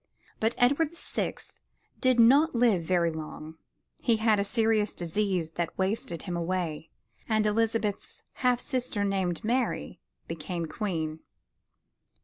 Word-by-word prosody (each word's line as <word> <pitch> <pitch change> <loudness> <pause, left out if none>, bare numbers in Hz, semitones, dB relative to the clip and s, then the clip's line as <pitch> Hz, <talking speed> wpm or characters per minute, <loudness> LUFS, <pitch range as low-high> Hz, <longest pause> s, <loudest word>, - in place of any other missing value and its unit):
But 225 +2 +1
Edward 285 +6 +3
the - - -15
Sixth - - -4 0.5
did 255 -2 +3
not 275 +6 +6
live 230 -7 +4
very 170 0 +1
long. 160 0 -8 0.4
He 230 - +2
had 220 -1 +3
a - - +2
serious 220 -1 +1
disease 175 -1 -1
that 170 0 -3
wasted 190 -3 -1
him 180 -3 -4
away, 170 -2 -2 0.4
and 215 -1 +2
Elizabeth's 215 -1 -1 0.2
half 250 -1 +3
sister 250 -6 -2
named 190 -4 -1
Mary, 240 +3 -1 0.3
became 165 +1 -4
Queen. 160 -3 -3
205 Hz, 125 wpm, -28 LUFS, 170-230 Hz, 0.5 s, not